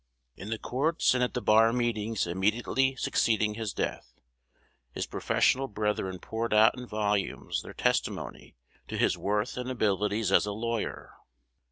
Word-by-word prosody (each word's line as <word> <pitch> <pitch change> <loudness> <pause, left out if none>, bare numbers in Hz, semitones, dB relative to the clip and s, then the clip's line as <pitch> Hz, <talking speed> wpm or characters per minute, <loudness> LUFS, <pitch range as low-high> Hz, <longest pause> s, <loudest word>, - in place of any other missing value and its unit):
In 100 - -8
the 115 - -2
courts 145 +9 +1
and 125 -1 +1
at 125 - -2
the 125 - -2
bar 110 +1 +5
meetings 115 -3 -1
immediately 110 +9 +1
succeeding 110 -4 +1
his 110 -1 -4
death, - - -4 0.8
his - - -3
professional 135 +1 +1
brethren 105 -4 -2
poured 110 +4 -2
out 110 +2 +6
in 125 -1 -8
volumes 105 -2 -1
their - - -11
testimony - - -2 0.3
to - - -4
his - - +2
worth 105 +3 -1
and 125 0 -4
abilities 105 -3 0
as 100 - +4
a 105 - -2
lawyer. 115 +1 -4
110 Hz, 150 wpm, -29 LUFS, 105-120 Hz, 0.8 s, out